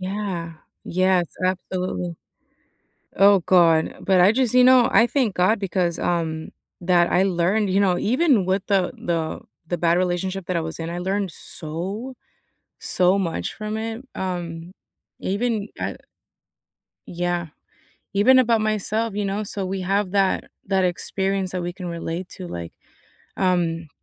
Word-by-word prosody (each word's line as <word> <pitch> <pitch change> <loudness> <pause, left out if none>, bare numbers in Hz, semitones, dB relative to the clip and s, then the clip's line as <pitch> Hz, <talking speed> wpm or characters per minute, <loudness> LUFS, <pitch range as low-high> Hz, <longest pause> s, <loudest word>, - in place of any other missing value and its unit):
qYeah. 185 -4 -4 0.3
Yes, 185 0 +2 0.2
absolutely. 185 -1 -2 1.0
Oh, 200 0 +6
God, 165 -3 +4
but 190 -2 +3
I 180 +3 +7
just, 250 -1 +1
you 250 - +7
know, 255 -2 +6
I 230 - +6
thank 240 -4 0
God 185 +5 +3
because, 180 -3 -1
um 160 -2 -2 0.3
that, 175 -1 +3
I 185 - +4
learned, 195 +3 +1
you 190 - +2
know, 185 -3 +2
even 250 - +2
with 190 +1 +1
the 195 -3 +2
the 165 -2 -2 0.3
the 175 - -2
bad 170 0 +2
relationship 185 +1 -1
that 180 - -1
I - - +1
was 160 +1 -6
in, 165 - -4
I 170 - -4
learned 190 +1 -1
so, 185 +12 -6 0.6
so 185 +2 +2
much 165 - -2
from 215 0 -4
it, 225 +3 -5
um, 175 -2 -4 0.5
even 210 +1 -1
I - - -3 1.1
Yeah, 175 0 -2 0.7
even 245 +7 +6
about 230 -3 +3
myself, 215 +1 -1
you 205 0 -1
know, 200 +2 -2
so 200 -1 -4
we 190 +1 -3
have 195 +1 0
that, 195 -1 +1 0.2
that 190 -1 +2
experience 190 +1 -1
that 185 - -3
we 175 0 -4
can 180 -1 -7
relate 170 +1 -4
to, 185 -2 -8
like, 85 - -7 0.6
um, 170 -3 0
185 Hz, 150 wpm, -23 LUFS, 175-205 Hz, 1.1 s, I